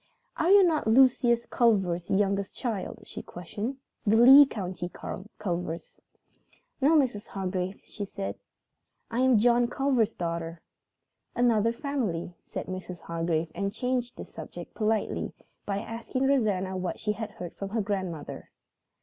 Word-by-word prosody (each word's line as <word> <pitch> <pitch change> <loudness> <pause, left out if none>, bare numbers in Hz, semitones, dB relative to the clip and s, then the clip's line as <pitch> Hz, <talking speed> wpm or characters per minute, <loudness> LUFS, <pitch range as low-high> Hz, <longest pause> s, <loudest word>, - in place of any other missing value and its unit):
"Are 330 - +1
you 400 0 +8
not 320 -9 +2
Lucius 240 0 +4
Culver's 190 -7 +1
youngest 200 0 0
child?" 225 -7 -3
she - - -8
questioned. 205 +9 -5 0.3
"The 215 +1 +3
Lee 265 +4 +10
County 185 -6 -4 0.5
Culvers?" 175 -4 -4 0.8
"No, 295 +5 +5
Mrs. 240 -8 0
Hargrave," 190 0 -3
said 205 -2 -6
Helen. 195 - -2 0.8
"I 230 - -1
am 260 -2 +5
John 240 +2 +4
Culver's 245 -4 +1
daughter." 170 -1 -3 0.8
"Another 230 -2 +3
family," 235 - -3
said - - -5
Mrs. 185 -1 -6
Hargrave 165 -1 -1
and 200 +2 -2
changed 250 +1 -2
the - - -6
subject - - -9
politely 220 -1 -1 0.3
by 200 -1 0
asking 230 +5 -3
Rosanna 205 -9 +1
what 180 -1 -3
she 210 - -1
had 215 0 -4
heard 180 -6 -7
from 195 - -5
her 220 +2 0
grandmother. 185 -7 -4
210 Hz, 135 wpm, -28 LUFS, 185-245 Hz, 0.8 s, Lee